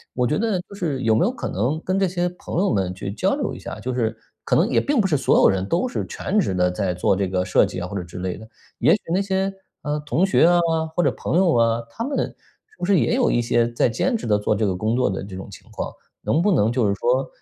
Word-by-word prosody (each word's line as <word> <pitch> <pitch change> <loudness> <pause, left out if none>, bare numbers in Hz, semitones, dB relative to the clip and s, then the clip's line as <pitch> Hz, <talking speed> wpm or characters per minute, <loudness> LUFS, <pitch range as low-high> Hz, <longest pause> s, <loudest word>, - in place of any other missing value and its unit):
我 125 -1 +1
觉 150 - 0
得 215 -4 0
就 200 - -10
是 155 -9 -2
有 110 -1 +3
没 - - +3
有 - - +1
可 - - -5
能 125 +11 -1
跟 185 +1 0
这 195 - +3
些 175 0 -1
朋 175 -1 -5
友 200 - +2
们 95 -3 0
去 95 +1 -5
交 105 - 0
流 - - -2
一 - - -9
下， - - -7
就 130 - -3
是 115 -2 0 0.3
可 - - +2
能 - - +3
也 - - +3
并 285 -5 +2
不 195 - +1
是 150 - +2
所 135 - +3
有 - - +6
人 95 0 -1
都 175 - +1
是 - - -3
全 210 +3 -1
职 155 - 0
地 90 0 +2
在 95 -1 -1
做 90 +2 +1
这 95 0 0
个 90 0 0
设 95 - +4
计 - - -5
啊 90 - -4
或 100 - -5
者 90 - -3
之 85 +1 -9
类 90 0 -3
的， 110 - -12 0.3
也 - - +5
许 210 - +2
那 185 - +2
些， 195 0 0 0.3
呃， 150 0 -1
同 150 +4 0
学 190 - +4
啊、 175 0 +4 0.4
或 175 - +2
者 - - +3
朋 - - -3
友 180 -3 +3
啊， 115 0 +2
他 225 - -5
们 275 +3 -2
是 435 - -22
不 - - -2
是 195 -1 +4
也 - - +1
有 250 -2 +2
一 120 - +2
些 120 0 +2
在 120 - +2
兼 180 - 0
职 215 - -6
地 105 -1 +3
做 105 +1 0
这 105 +1 0
个 95 - -1
工 110 +5 0
作 125 -4 +2
的 95 - -3
这 95 -1 -8
种 95 - -8
情 - - -13
况？ - - -4 0.3
能 160 - +1
不 205 - +3
能 115 - +3
就 120 -4 +1
是 100 - +2
说， 130 +5 +1
125 Hz, 315 characters per minute, -22 LUFS, -, 0.4 s, 有